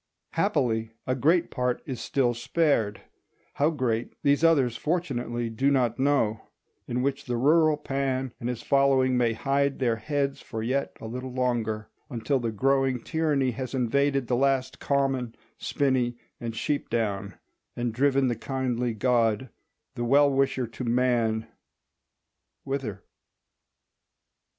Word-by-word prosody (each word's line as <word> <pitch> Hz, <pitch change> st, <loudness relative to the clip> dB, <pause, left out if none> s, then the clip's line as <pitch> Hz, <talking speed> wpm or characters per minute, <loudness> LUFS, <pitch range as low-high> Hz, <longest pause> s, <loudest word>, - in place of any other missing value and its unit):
Happily 115 Hz, -, 0 dB
a 130 Hz, -, 0 dB
great 160 Hz, +7 st, +2 dB
part 125 Hz, -1 st, -1 dB
is 130 Hz, -5 st, -5 dB
still 125 Hz, -3 st, +1 dB
spared—how 120 Hz, -, -1 dB
great 125 Hz, -7 st, -1 dB
these 145 Hz, +2 st, +3 dB
others 140 Hz, -8 st, +4 dB
fortunately 125 Hz, -8 st, -2 dB
do 130 Hz, +5 st, +1 dB
not 125 Hz, -4 st, +1 dB
know—in 125 Hz, -2 st, -1 dB
which 140 Hz, 0 st, -1 dB
the 120 Hz, -2 st, -1 dB
rural 155 Hz, +4 st, +4 dB
Pan 135 Hz, -3 st, -2 dB
and 120 Hz, -, -3 dB
his 125 Hz, -2 st, -4 dB
following 135 Hz, -2 st, +3 dB
may 120 Hz, -2 st, +2 dB
hide 140 Hz, +4 st, 0 dB
their 120 Hz, -3 st, +1 dB
heads 140 Hz, +2 st, -2 dB
for 110 Hz, -3 st, -5 dB
yet 130 Hz, +4 st, -1 dB
a -, -, -9 dB
little 125 Hz, +3 st, -5 dB
longer, 115 Hz, -4 st, -1 dB, 0.2 s
until 130 Hz, +2 st, 0 dB
the 115 Hz, -2 st, -2 dB
growing 135 Hz, +3 st, +2 dB
tyranny 150 Hz, -5 st, +1 dB
has 130 Hz, +2 st, -5 dB
invaded 135 Hz, +2 st, +1 dB
the 125 Hz, -, 0 dB
last 130 Hz, 0 st, +1 dB
common, 135 Hz, -4 st, 0 dB, 0.2 s
spinney, 130 Hz, -4 st, 0 dB, 0.2 s
and 115 Hz, -1 st, -5 dB
sheep 145 Hz, +5 st, -2 dB
down, 105 Hz, -4 st, -2 dB, 0.4 s
and 120 Hz, -2 st, -2 dB
driven 135 Hz, +2 st, +3 dB
the 120 Hz, -, 0 dB
kindly 125 Hz, -1 st, -2 dB
god, 120 Hz, +1 st, +1 dB, 0.4 s
the 120 Hz, -, -3 dB
well 140 Hz, +4 st, +5 dB
wisher 135 Hz, -2 st, +1 dB
to 115 Hz, +3 st, -7 dB
man—whither? 120 Hz, 0 st, -3 dB
130 Hz, 130 wpm, -27 LUFS, 120-140 Hz, 0.4 s, well